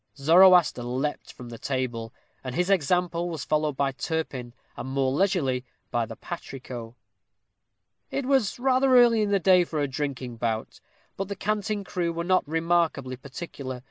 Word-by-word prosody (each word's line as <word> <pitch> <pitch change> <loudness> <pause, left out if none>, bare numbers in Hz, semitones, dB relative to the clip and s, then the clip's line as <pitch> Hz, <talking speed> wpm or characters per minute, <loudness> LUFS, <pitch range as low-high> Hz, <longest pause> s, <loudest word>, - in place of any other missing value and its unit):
Zoroaster 175 0 +6
leaped 130 +5 -3
from 125 -2 -11
the 115 -1 -9
table, 120 -4 -3 0.3
and 130 -1 -5
his 180 +2 +1
example 175 0 +1
was 165 -2 -5
followed 150 -2 0
by 140 -1 +1
Turpin, 135 -4 -4 0.2
and 130 - -6
more 135 -1 +1
leisurely 140 -6 +1 0.3
by 115 -1 0
the 115 - -8
patrico. 125 -8 -8 1.1
It 275 - -2
was 265 -6 +2
rather 260 +1 +4
early 235 -2 +6
in 210 - +1
the 200 - +3
day 185 -1 +5
for 160 -3 -4
a 145 - +1
drinking 130 -3 -4
bout. 110 -1 -3 0.4
But 195 - -3
the 200 - -4
Canting 210 0 -2
Crew 175 -3 -2
were 170 0 -3
not 185 -1 +2
remarkably 165 -5 0
particular. 130 -1 -7
155 Hz, 160 wpm, -26 LUFS, 130-185 Hz, 1.1 s, Zoroaster